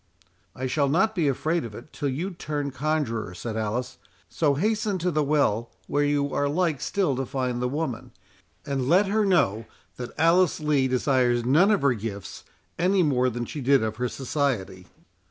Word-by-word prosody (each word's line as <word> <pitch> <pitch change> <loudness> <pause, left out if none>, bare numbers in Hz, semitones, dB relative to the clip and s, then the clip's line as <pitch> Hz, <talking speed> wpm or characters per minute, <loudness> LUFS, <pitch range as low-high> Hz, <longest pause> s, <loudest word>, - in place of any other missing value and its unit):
"I 130 - -4
shall 140 +2 +1
not 190 +9 +2
be 170 -7 +1
afraid 155 +5 0
of 110 -3 -8
it 120 +7 -12
till 145 -3 -2
you 165 +9 -3
turn 145 -5 -4
conjuror," 130 - -2
said 110 +4 -5
Alice; 110 +3 -3 0.3
"so 145 -4 +1
hasten 215 - 0
to 180 0 -1
the 155 -1 +1
well, 140 -6 +1 0.2
where 145 0 0
you 145 -1 0
are 145 0 +1
like 160 -3 0
still 185 -9 0
to 135 - -2
find 125 -2 -2
the 125 - 0
woman, 145 -4 -3 0.6
and 135 -3 -2
let 185 +5 +5
her 210 +2 +1
know 125 - +2 0.3
that 125 -1 -5
Alice 170 +2 +4
Lee 150 -3 +2
desires 125 -2 +1
none 160 +11 +5
of 210 -7 +2
her 140 -2 +4
gifts, 105 -3 -6 0.4
any 185 +2 +3
more 130 -4 +2
than 120 0 -4
she 145 - -6
did 135 -1 +3
of 110 0 -3
her 125 0 -1
society." 120 -10 -2
140 Hz, 185 wpm, -25 LUFS, 125-160 Hz, 0.6 s, let